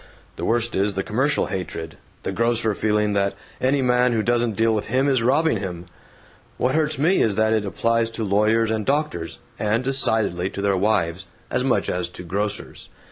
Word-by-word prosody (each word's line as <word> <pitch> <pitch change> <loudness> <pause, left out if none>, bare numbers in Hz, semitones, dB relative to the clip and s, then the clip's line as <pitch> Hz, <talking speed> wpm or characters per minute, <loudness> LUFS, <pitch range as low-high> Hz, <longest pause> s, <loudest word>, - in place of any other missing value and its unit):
The - - -4
worst 120 0 0
is 100 +1 0
the 95 - -1
commercial 130 +7 +1
hatred 80 -4 -5 0.3
the - - -2
grocer 115 -2 +1
feeling 105 0 +1
that 100 -1 0 0.3
any 135 +1 +2
man 125 0 +3
who 110 -2 +1
doesn't 120 -2 +1
deal 115 +1 +2
with 105 -1 -2
him 130 +5 +1
is 135 -4 +2
robbing 140 +3 +2
him. 90 -3 -5 0.7
What 130 +1 +1
hurts 155 -2 +1
me 165 +8 +3
is 105 -3 +2
that 110 +1 +2
it 110 -2 0
applies 115 +3 +1
to 115 - -2
lawyers 110 +2 +2
and 110 -1 -1
doctors 135 - -1 0.2
(and 110 +3 +1
decidedly 110 -9 +1
to 100 - -6
their 100 -1 +2
wives!) 95 -3 0 0.2
as 125 - 0
much 120 -7 +1
as 90 -1 -2
to 90 - -9
grocers. 100 +4 -4
110 Hz, 190 wpm, -22 LUFS, 100-125 Hz, 0.7 s, man